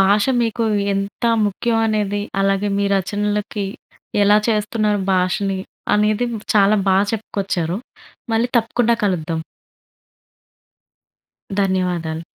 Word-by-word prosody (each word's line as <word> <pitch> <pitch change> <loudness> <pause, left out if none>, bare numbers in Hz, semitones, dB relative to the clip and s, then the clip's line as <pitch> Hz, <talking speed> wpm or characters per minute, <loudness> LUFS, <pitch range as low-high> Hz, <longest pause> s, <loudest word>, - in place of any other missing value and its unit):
భాష 200 +2 +4 0.2
మీకు 230 0 -1 0.3
ఎంత 195 +4 -4 0.2
ముఖ్యం 225 +3 0
అనేది 205 -2 0 0.2
అలాగే 195 +1 +1
మీ 200 - +1
రచనలకి 205 +1 -2 0.6
ఎలా 205 +1 +5
చేస్తున్నారు 210 -1 +1
భాషని 190 +1 0 0.3
అనేది 210 +3 +2 0.3
చాలా 205 +1 +5
బాగా 195 +2 +4
చెప్పుకొచ్చారు. 195 -5 -2 0.6
మళ్ళీ 230 +2 +2
తప్పకుండా 235 +1 +2
కలుద్దాం. 165 -4 -1 2.2
ధన్యవాదాలు. 175 -4 -1
205 Hz, 90 wpm, -20 LUFS, 190-215 Hz, 2.2 s, ఎలా